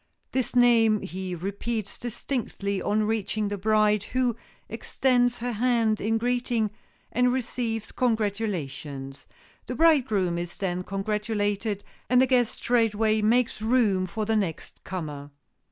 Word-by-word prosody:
This 260 -1 -1
name 230 -3 +5
he 185 +1 -5
repeats 200 +4 -4
distinctly 220 -5 -3
on 215 +1 +1
reaching 215 -1 -1
the 205 - -3
bride, 210 0 +3
who 250 -2 0 0.3
extends 245 -2 +1
her 245 +1 -3
hand 230 -1 +1
in 225 +2 +1
greeting, 240 -2 0 0.4
and 250 +1 +3
receives 235 -3 -2
congratulations. 175 - -2 0.4
The - - -3
bridegroom 225 - +3
is 175 0 -6
then 180 -2 -2
congratulated, 205 +1 -2 0.3
and 250 - +5
the 260 - +6
guest 250 -2 +2
straightway 220 -2 +2
makes 230 +1 +2
room 220 -5 +2
for 215 +4 -3
the 220 +1 +1
next 190 -7 -3
comer. 150 -6 -6
215 Hz, 125 wpm, -26 LUFS, 195-240 Hz, 0.4 s, the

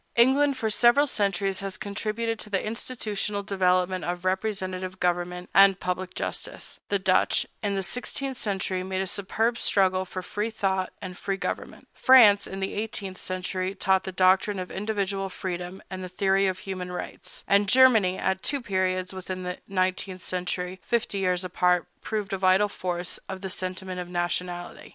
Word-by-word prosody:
England, 270 +3 +4
for 220 -4 -1
several 240 +6 +5
centuries, 195 -6 0
has 195 -1 -5
contributed 215 +2 -2
to 210 - -5
the 195 -2 0
institutional 215 -3 -3
development 185 -2 +1
of 175 +1 -3
representative 185 -1 -2
government 180 0 -1
and 195 -1 +7
public 180 0 -3
justice; - - -5
the 200 - +2
Dutch, 190 -1 +2 0.2
in 200 -2 -1
the 195 - -1
sixteenth 255 +6 -4
century, 190 -4 -2
made 190 0 -2
a - - -3
superb 220 +5 0
struggle 190 -1 +3
for 185 0 -6
free 210 +4 -2
thought 190 -4 -1
and 180 -1 -6
free 195 +1 -2
government; - - -5
France, 230 -6 +7
in 195 0 -6
the 195 - -2
eighteenth 205 -3 -4
century, 185 +1 -3
taught 190 0 +2
the 190 - -5
doctrine 190 +2 +3
of 185 -1 -5
individual 195 -1 -2
freedom 180 0 -5
and 185 0 -5
the 185 - -6
theory 195 +1 +2
of 185 -1 -1
human 185 -1 -5
rights; 180 - -8
and 200 0 +4
Germany, 225 -7 +6
at 190 0 0
two 285 - 0
periods 185 -4 -1
within 185 0 -5
the 180 0 -4
nineteenth 185 -1 -1
century, 180 0 -3
fifty 230 -4 -1
years 180 -1 +1
apart, 180 -1 +2 0.2
proved 210 -2 -3
the 195 - -2
vital 190 +2 +4
force 180 -2 -4
of 190 -1 -5
the 190 -1 -3
sentiment 185 0 -4
of 175 -1 -5
nationality. 175 0 -3
190 Hz, 170 wpm, -26 LUFS, 185-205 Hz, 0.2 s, and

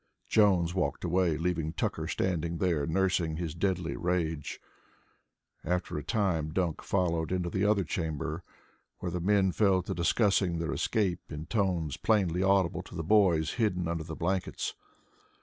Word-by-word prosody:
Jones 95 -6 +3
walked 90 -1 -1
away, 90 -2 +1
leaving 80 -2 -1
Tucker 80 0 -2
standing 85 -2 -1
there 80 -5 0
nursing 85 -2 +1
his 85 -3 -3
deadly 90 -1 -1
rage. 85 -4 -2 1.0
After 90 0 -2
a 75 - -3
time 90 -8 0
Dunk 85 -1 -1
followed 85 -4 0
into 90 -2 -1
the 95 +2 0
other 105 -1 +3
chamber, 80 0 -3 0.5
where 90 - -4
the 90 0 -3
men 95 0 +3
fell 95 -2 +3
to - - -3
discussing 95 0 +2
their 80 -1 -2
escape 100 -8 -1
in 75 +1 -5
tones 90 - 0
plainly 95 -5 +2
audible 95 -2 +2
to - - -12
the 80 - -3
boys 90 -4 +3
hidden 90 -6 +1
under 85 -1 -2
the 80 0 -7
blankets. 95 +3 -2
90 Hz, 150 wpm, -30 LUFS, 80-95 Hz, 1.0 s, Jones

